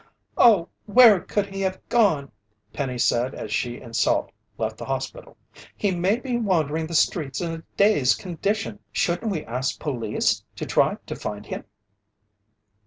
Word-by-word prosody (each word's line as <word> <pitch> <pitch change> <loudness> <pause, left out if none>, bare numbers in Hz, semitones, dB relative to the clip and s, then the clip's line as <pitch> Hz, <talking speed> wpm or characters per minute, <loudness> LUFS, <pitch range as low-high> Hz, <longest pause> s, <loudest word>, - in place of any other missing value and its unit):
"Oh, 205 -8 +5 0.2
where 220 -2 +7
could 205 +3 -1
he 195 0 -6
have 190 -1 -1
gone?" 195 - +2 0.4
Penny 130 -3 -3
said 120 +2 +1
as 105 - -5
she 120 +4 -1
and 115 -2 -10
Salt - - +1 0.3
left - - -3
the - - -6
hospital. - - -5 0.4
"He 205 - +1
may 185 +3 +2
be 250 0 -2
wandering 160 -7 0
the 165 - -5
streets 145 -4 +1
in 170 -2 -2
a 165 0 -7
dazed 200 -11 +4
condition. 180 - -2
Shouldn't 175 - 0
we 160 -5 -3
ask 125 +3 -2
police 110 -6 -1
to - - -5
try - - +2
to - - -5
find 105 0 -6
him?" - - -6
165 Hz, 160 wpm, -24 LUFS, 125-200 Hz, 0.4 s, where